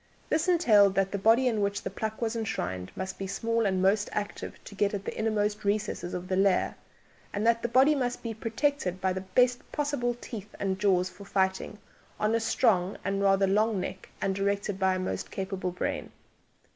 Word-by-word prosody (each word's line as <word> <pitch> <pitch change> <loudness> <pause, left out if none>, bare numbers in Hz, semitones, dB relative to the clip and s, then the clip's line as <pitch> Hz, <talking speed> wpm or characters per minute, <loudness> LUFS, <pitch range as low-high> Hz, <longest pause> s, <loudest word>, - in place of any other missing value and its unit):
This 320 +3 +1
entailed 215 - +5
that 195 0 +1
the 200 - -2
body 230 +6 +4
in 220 -4 +1
which 200 0 -1
the - - -4
pluck 220 +3 -4
was 225 0 -1
enshrined 95 - -3
must 190 0 -5
be 195 - -3
small 230 +3 0
and 190 -1 0
most 205 +2 +3
active, 205 0 -4
to - - -11
get 200 +1 +1
at 195 - -6
the - - -4
innermost 215 -1 0
recesses 200 -3 -1
of 180 0 -5
the 185 - 0
lair, 195 -1 +3 0.6
and 205 +2 -2
that 230 0 +3
the - - 0
body 260 +5 +5
must 250 -4 -2
be 230 -1 -3
protected 225 -3 -1
by 190 -1 +1
the 190 - -3
best 245 +6 +2
possible 285 -5 -1
teeth 210 -4 -8
and 190 -1 -1
jaws 185 -2 +3
for 190 +3 -12
fighting, 190 +1 0 0.4
on 215 +1 +1
a 230 - +3
strong 195 -4 +2
and 195 0 0
rather 195 0 +4
long 210 +2 +2
neck 185 +1 -6
and 195 - 0
directed 200 0 -1
by 190 -1 +3
a - - -2
most 185 - -3
capable 190 -1 -3
brain. 180 - -3
200 Hz, 200 wpm, -28 LUFS, 190-225 Hz, 0.6 s, entailed